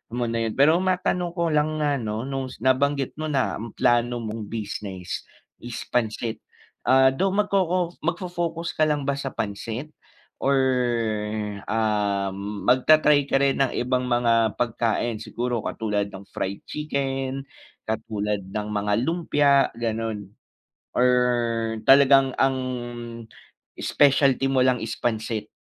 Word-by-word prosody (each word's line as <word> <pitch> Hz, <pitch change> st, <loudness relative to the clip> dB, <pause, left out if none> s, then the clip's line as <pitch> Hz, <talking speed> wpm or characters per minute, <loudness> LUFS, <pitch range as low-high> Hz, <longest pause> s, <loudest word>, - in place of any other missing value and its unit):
mo 120 Hz, -1 st, 0 dB
na 115 Hz, 0 st, 0 dB
yun, -, -, -5 dB
pero 150 Hz, +4 st, +6 dB
matanong 180 Hz, -1 st, 0 dB
ko 170 Hz, 0 st, +1 dB
lang 150 Hz, +1 st, +1 dB
na 145 Hz, -1 st, +1 dB
ano 110 Hz, +1 st, -3 dB
nung 135 Hz, -1 st, -3 dB, 0.2 s
nabanggit 135 Hz, +1 st, +1 dB
mo 155 Hz, -, -2 dB
na 135 Hz, -3 st, +1 dB
ang 115 Hz, 0 st, -7 dB
plano 120 Hz, 0 st, +2 dB
mong 110 Hz, 0 st, -5 dB
business 100 Hz, -4 st, -5 dB, 0.4 s
is 120 Hz, 0 st, -6 dB
pansit. 115 Hz, -1 st, -1 dB, 0.5 s
Ah, 130 Hz, 0 st, +6 dB
though 190 Hz, +9 st, 0 dB
magkoko 185 Hz, -4 st, +1 dB
magfo-focus 170 Hz, -1 st, -3 dB
ka 155 Hz, -, +4 dB
lang 150 Hz, -1 st, 0 dB
ba 140 Hz, -, 0 dB
sa 135 Hz, -1 st, -4 dB
pansit? 110 Hz, +6 st, -4 dB, 0.5 s
Or 140 Hz, -, +2 dB, 1.1 s
ah, 105 Hz, -3 st, 0 dB, 0.4 s
magta-try 145 Hz, +3 st, +5 dB
ka 135 Hz, -, +2 dB
rin 135 Hz, -1 st, +2 dB
ng 135 Hz, -2 st, +2 dB
ibang 125 Hz, 0 st, 0 dB
mga 115 Hz, -3 st, +2 dB
pagkain? 115 Hz, -1 st, 0 dB
Siguro 120 Hz, +2 st, -3 dB
katulad 105 Hz, -2 st, -1 dB
ng 95 Hz, -, -8 dB
fried 100 Hz, +1 st, -4 dB
chicken, 135 Hz, -2 st, -2 dB, 0.5 s
katulad 105 Hz, -2 st, -2 dB
ng 105 Hz, +2 st, -4 dB
mga 105 Hz, 0 st, 0 dB
lumpia, 145 Hz, -4 st, +3 dB
ganun. 115 Hz, -3 st, -3 dB, 0.6 s
Or 125 Hz, -, +3 dB, 0.8 s
talagang 135 Hz, -1 st, +6 dB
ang 135 Hz, 0 st, +2 dB, 1.2 s
specialty 140 Hz, -2 st, +3 dB
mo 135 Hz, -, +2 dB
lang 125 Hz, -2 st, +2 dB
is 115 Hz, -, -4 dB
pansit? 110 Hz, -2 st, -2 dB
130 Hz, 130 wpm, -24 LUFS, 110-145 Hz, 1.2 s, pero